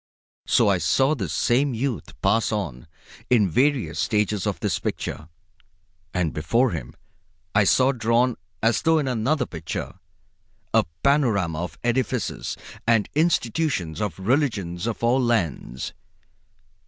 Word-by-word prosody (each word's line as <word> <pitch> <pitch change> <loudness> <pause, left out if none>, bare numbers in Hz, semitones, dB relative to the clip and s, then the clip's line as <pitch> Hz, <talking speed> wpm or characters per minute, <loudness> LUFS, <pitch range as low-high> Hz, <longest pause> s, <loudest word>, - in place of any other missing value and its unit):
So - - +4
I 95 -3 +3
saw 130 - +3
this 155 - -3
same 130 +2 +2
youth 125 0 -3
pass 115 +1 +2
on, 80 - -4 0.4
in 110 -5 +4
various 130 - +1
stages 105 -2 0
of - - -2
this - - -1
picture, 75 - -4 0.8
and 90 -4 -1
before 115 +11 +1
him 75 -9 -6 0.6
I 105 0 +4
saw 130 +6 +4
drawn, 120 0 +2 0.3
as 115 0 +3
though 160 0 +3
in 145 -3 0
another 130 +3 +1
picture, 85 +2 -6 0.7
a 110 -2 +4 0.2
panorama 110 - +2
of 85 -1 -6
the - - -1
edifices 125 -1 -1 0.3
and 115 -3 +3
institutions 145 - 0
of 105 -6 -2
the 95 - -11
religions 105 - 0
of 115 0 -4
all 125 +3 +3
lands. 85 - -1
115 Hz, 135 wpm, -24 LUFS, 90-130 Hz, 0.8 s, So